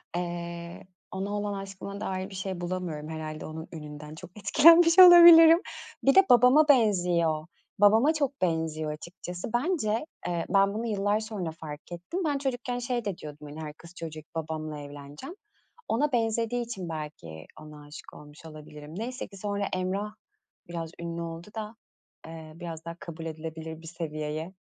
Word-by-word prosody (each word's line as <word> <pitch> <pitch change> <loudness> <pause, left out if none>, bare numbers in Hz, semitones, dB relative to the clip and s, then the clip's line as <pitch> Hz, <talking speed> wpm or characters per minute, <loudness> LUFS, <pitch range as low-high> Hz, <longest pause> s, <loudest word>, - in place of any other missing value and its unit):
Eee, 170 0 -5 0.2
ona 195 +2 -4
olan 205 0 -2
aşkıma 195 0 -7
dair 190 -1 -3
bir 195 - -10
şey 190 -2 -4
bulamıyorum, 175 -4 -4
herhâlde 155 -1 -6
onun 160 +1 -7
ününden, 150 -1 -9
çok 180 +2 -11
etkilenmiş 330 - +6
olabilirim. 340 -2 +10 0.4
Bir 275 - +4
de, 385 - +8
babama 250 +5 +6
benziyor, 175 - +3 0.3
babama 220 +9 +5
çok 280 -5 -2
benziyor 160 -3 -1
açıkçası. 175 +3 -7
Bence, 240 - 0 0.2
eee, 170 -1 -2
ben 195 0 +3
bunu 225 +2 -3
yıllar 205 0 +1
sonra 210 -6 -4
fark 155 0 -10
ettim. 180 - -4
Ben 290 -2 +1
çocukken 250 -2 -3
şey 240 -1 -2
de 195 -4 -3
diyordum, 150 0 -10
hani, 150 +2 -8
her 150 -1 -6
kız 170 +2 -15
çocuğu 160 -2 -7
gibi, 155 - -17
babamla 155 -1 -4
evleneceğim. 145 - -10 0.5
Ona 285 +6 +1
benzediği 230 0 0
için, 190 -7 -6
belki 150 - -7 0.2
ona 150 -1 -12
aşık 145 - -12
olmuş 150 +2 -14
olabilirim. 150 -1 -11
Neyse 250 +4 -5
ki, 195 - -14
sonra 200 0 -2
Emrah 195 +3 -2 0.6
biraz 165 -1 -5
ünlü 170 0 -5
oldu 165 +1 -7
da, 215 0 -6 0.5
eee, 160 -1 -9
biraz 165 -2 -8
daha 170 0 -6
kabul 165 -1 -8
edilebilir 160 0 -7
bir 165 - -11
seviyeye 155 0 -5
175 Hz, 160 wpm, -28 LUFS, 160-220 Hz, 0.6 s, olabilirim